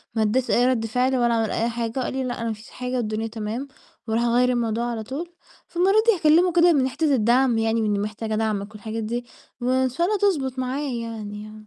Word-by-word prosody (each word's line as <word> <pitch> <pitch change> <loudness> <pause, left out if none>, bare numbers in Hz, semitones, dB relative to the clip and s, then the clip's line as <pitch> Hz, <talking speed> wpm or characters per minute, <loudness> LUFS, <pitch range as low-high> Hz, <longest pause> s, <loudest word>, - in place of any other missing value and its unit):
ما 220 - +1
اداش 240 +4 +1
أي 245 - +4
رد 235 -3 +1
فعل، 250 +4 +1
ولا 240 -1 +2
عمل 225 -1 0
أي 230 +1 0
حاجة 230 +2 -3
وقال 255 - -2
لي: 265 0 -2
"لأ، 245 -2 -4
أنا 230 - -2
ما 225 - -1
فيش 215 +2 -13
حاجة، 250 0 -5
والدنيا 220 -1 -2
تمام." 225 +4 -4 0.4
وراح 225 +2 +1
غيَّر 245 +1 +3
الموضوع 235 -1 0
على 220 -2 -4
طول، 325 +9 -6 0.3
فالمرة 365 +4 +2
دي 455 - +6
هاكلِّمه 335 +2 +4
كده، 345 -1 +5
من 265 -3 +2
حتة 290 +1 +1
الدعم 240 +1 +3
يعني، 225 0 +1
من 215 - 0
إني 205 -1 +1
محتاجة 215 +1 -3
دعمك 210 -2 -1
والحاجات 220 +1 -5
دي، 240 +2 -3 0.4
وإن 255 +1 +2
شاء 340 +8 0
الله 420 0 +1
تضبط 275 -11 0
معايا 255 -1 -2
يعني. 215 0 -8
240 Hz, 220 wpm, -23 LUFS, 220-265 Hz, 0.4 s, دي